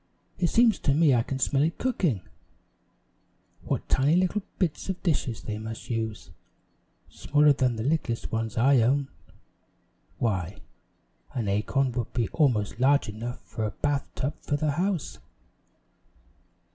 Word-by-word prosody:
"It 175 - +3
seems 230 +3 +4
to 140 - +1
me 155 -3 +5
I 120 - +4
can 130 +3 -4
smell 135 +1 +1
it 160 +3 +1
cooking. 175 - 0 1.4
What - - -3
tiny 140 +5 +3
little 185 +3 +1 0.2
bits 180 0 -1
of 190 - -4
dishes 135 - -1
they 105 0 -4
must 110 +2 -7
use 110 -6 -3 0.8
smaller 150 0 +3
than 130 -3 +1
the 110 - -3
littlest 135 -4 -1
ones 115 -1 -2
I 130 +2 +5
own. 135 +4 +2 1.1
Why, 95 -5 -1 0.8
an 115 -5 -1
acorn 115 +7 +1
would 120 -2 -4
be 115 -5 0
almost 115 -9 +1
large 140 -1 +3
enough 115 +3 -6
for 110 - -6
a 105 - 0
bath 145 +5 -1
tub 140 +3 -2
for 145 - -1
the 150 0 0
house." 180 +1 -2
130 Hz, 145 wpm, -27 LUFS, 115-150 Hz, 1.4 s, me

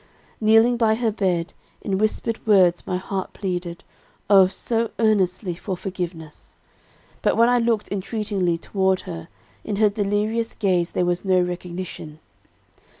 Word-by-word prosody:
"Kneeling 225 +3 +5
by 220 -2 +3
her 225 -1 0
bed, 180 -5 -1 0.3
in 195 -2 -1
whispered 215 +1 -1
words 185 -4 +4
my 180 - -1
heart 190 0 -4
pleaded, 175 -3 -4 0.5
oh, 195 -2 +8
so 230 +4 -1
earnestly, 200 -4 +1
for 185 +2 -5
forgiveness. 175 -5 -7 0.7
But, - - +1
when 230 +1 +5
I 245 0 +3
looked 230 -2 0
entreatingly 200 -3 -1
toward 190 +1 0
her, 165 -3 -8 0.4
in 210 - -3
her 210 +1 +4
delirious 210 +3 -1
gaze 185 -5 +1
there 180 - +1
was 175 0 -1
no 185 -2 +3
recognition. 180 -3 -5
195 Hz, 140 wpm, -23 LUFS, 180-215 Hz, 0.7 s, oh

